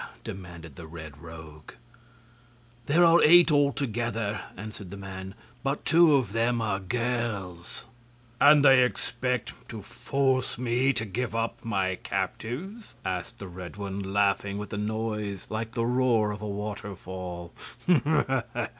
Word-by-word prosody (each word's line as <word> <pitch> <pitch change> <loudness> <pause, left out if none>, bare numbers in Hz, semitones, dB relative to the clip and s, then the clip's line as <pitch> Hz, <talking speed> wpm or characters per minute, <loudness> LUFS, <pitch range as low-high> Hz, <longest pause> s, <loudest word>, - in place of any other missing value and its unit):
demanded 85 -6 -9
the 80 - -9
Red 80 -3 -9
Rogue. 80 -2 -11 1.1
"There 170 +4 +5
are 170 +1 +6
eight, 170 +1 +8
altogether," 120 -7 0 0.2
answered 100 -1 -8
the 100 - -8
man, 95 0 -7 0.3
"but 135 +2 -2
two 160 -1 +6
of 120 -7 0
them 115 +1 +1
are 105 -4 0
girls." 105 -5 -3 0.5
"And 145 0 +7
they 135 -2 +8
expect 125 -1 -2 0.2
to 110 -4 -7
force 130 +4 0
me 125 +2 +2
to 110 -2 -1
give 115 +3 -3
up 115 0 -2
my 95 -4 0
captives?" 190 - -4
asked 95 +6 -3
the 100 - -8
Red 90 +1 -8
One, 100 -1 -4
laughing 100 0 +1
with 105 -1 -6
a - - -2
noise 105 -2 -3
like 110 +1 -3
the 115 - 0
roar 120 -3 +2
of 105 0 -6
a 105 - -4
waterfall. 95 -4 -6
110 Hz, 135 wpm, -27 LUFS, 95-125 Hz, 1.1 s, eight